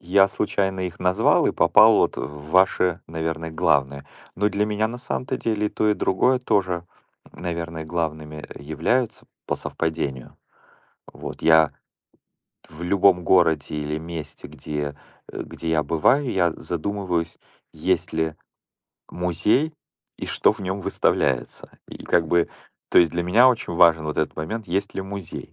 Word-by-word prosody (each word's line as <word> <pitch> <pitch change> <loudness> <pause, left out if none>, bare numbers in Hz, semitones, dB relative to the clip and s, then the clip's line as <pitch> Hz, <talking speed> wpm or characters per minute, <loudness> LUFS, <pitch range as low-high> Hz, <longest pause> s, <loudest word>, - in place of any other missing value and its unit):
я 95 +2 +4
случайно 95 -2 -1
их 90 -2 -4
назвал 90 +5 +3
и - - +1
попал - - +6
вот - - +2
в 75 +1 -7
ваши, 90 -1 +3
наверное, 80 0 -4
главные. 70 -3 0 0.3
Но 105 +2 +2
для 105 +1 0
меня 105 +1 0
на 120 +2 -7
самом-то 125 0 -3
деле 105 -2 -1
и - - 0
то, 110 - 0
и 105 - +3
другое 125 +8 +2
тоже, 95 -7 0 0.5
наверное, 85 -2 -5
главными 80 -2 -4 0.2
являются 115 - -1 0.2
по - - 0
совпадению. 80 -6 -4 0.8
Вот, - - -8
я 80 -1 +5 1.0
в 80 - -11
любом 90 0 +3
городе 80 -5 +2
или 75 +1 -3
месте, 80 -2 -8
где, 75 -2 -5 0.3
э, - - -5
где 80 - -6
я 80 -1 +2
бываю, 120 - +2
я 90 -3 +2
задумываюсь, 90 -1 -3 0.3
есть - - -1
ли 80 -1 -1 0.8
музей 90 - 0 0.4
и - - -5
что - - +3
в 110 - -12
нём 95 +1 -3
выставляется. 65 -7 -1 0.2
И, - - -11
как 85 -2 +2
бы, 85 +1 +2 0.4
то - - +5
есть 85 -2 +4
для 85 0 -1
меня 115 +9 +5
очень 110 -8 -1
важен 80 -2 +5
вот 75 - -4
этот 80 - -1
момент, 105 +8 -4
есть 100 +3 -2
ли 95 - -3
музей 95 -3 -7
85 Hz, 150 wpm, -23 LUFS, 80-100 Hz, 1.0 s, попал